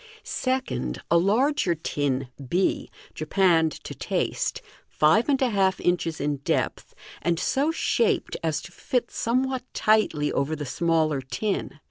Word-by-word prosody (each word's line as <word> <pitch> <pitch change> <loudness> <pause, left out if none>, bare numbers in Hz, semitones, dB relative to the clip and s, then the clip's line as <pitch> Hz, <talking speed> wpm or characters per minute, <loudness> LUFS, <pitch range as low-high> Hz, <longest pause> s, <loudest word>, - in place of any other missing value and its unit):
Second, 260 0 -2
a 170 - +6
larger 220 - +2
tin 140 -4 -2 0.2
b, 185 +5 +1 0.2
japanned 165 0 +2
to - - -6
taste, - - -2 0.3
five 185 - +3
and 275 -2 +3
a 250 - +2
half 195 -2 +2
inches 170 -2 0
in 145 0 -1
depth, 140 - -2 0.3
and 170 -1 0
so 275 - +1
shaped 240 -7 +1
as 160 -1 -1
to - - -10
fit 240 +6 -2
somewhat 255 +2 0
tightly 210 -9 +2
over 150 +3 0
the 145 -1 -5
smaller 155 0 +1
tin. 190 +7 -3
175 Hz, 135 wpm, -25 LUFS, 155-235 Hz, 0.3 s, a